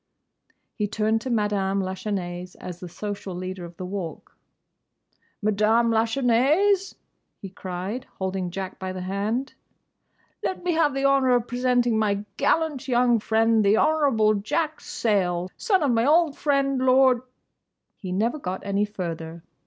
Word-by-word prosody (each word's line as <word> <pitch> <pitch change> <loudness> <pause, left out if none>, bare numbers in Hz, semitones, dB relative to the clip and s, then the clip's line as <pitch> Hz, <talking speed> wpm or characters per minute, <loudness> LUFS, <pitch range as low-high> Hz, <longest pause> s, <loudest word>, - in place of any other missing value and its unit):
He 210 - -2
turned 215 +1 0
to 260 - -5
Madame 205 -4 0
Lachesnais 185 -2 -4
as 175 -1 -7
the 180 - -8
social 200 0 -6
leader 185 0 -5
of 170 0 -12
the 185 - -5
Walk. 185 -3 -6 1.1
"Madame 215 +3 +3
Lachesnais!" 270 - +2 0.4
he 195 - -8
cried, 190 +6 -5
holding 190 -1 -2
Jack 190 +1 -6
by 185 0 -4
the 185 - -5
hand, 205 +8 -2 0.9
"Let 375 - -3
me 360 - +1
have 315 -4 +2
the 275 0 0
honour 270 -2 +4
of 240 -1 +1
presenting 245 -2 +1
my 205 -1 0
gallant 315 -6 +1
young 245 -2 +3
friend, 225 0 +2
the 205 +2 +4
Honourable 275 -9 +3
Jack 300 +10 -1
Sayle, 185 -5 -1
son 385 -7 +1
of 280 - +2
my 230 +2 +2
old 320 -1 +4
friend, 275 -2 +1
Lord—" 255 -1 +4 0.7
He 185 -3 -7
never 225 +10 0
got 190 -7 -5
any 200 +1 +1
further. 170 -5 -6
220 Hz, 145 wpm, -25 LUFS, 190-260 Hz, 1.1 s, honour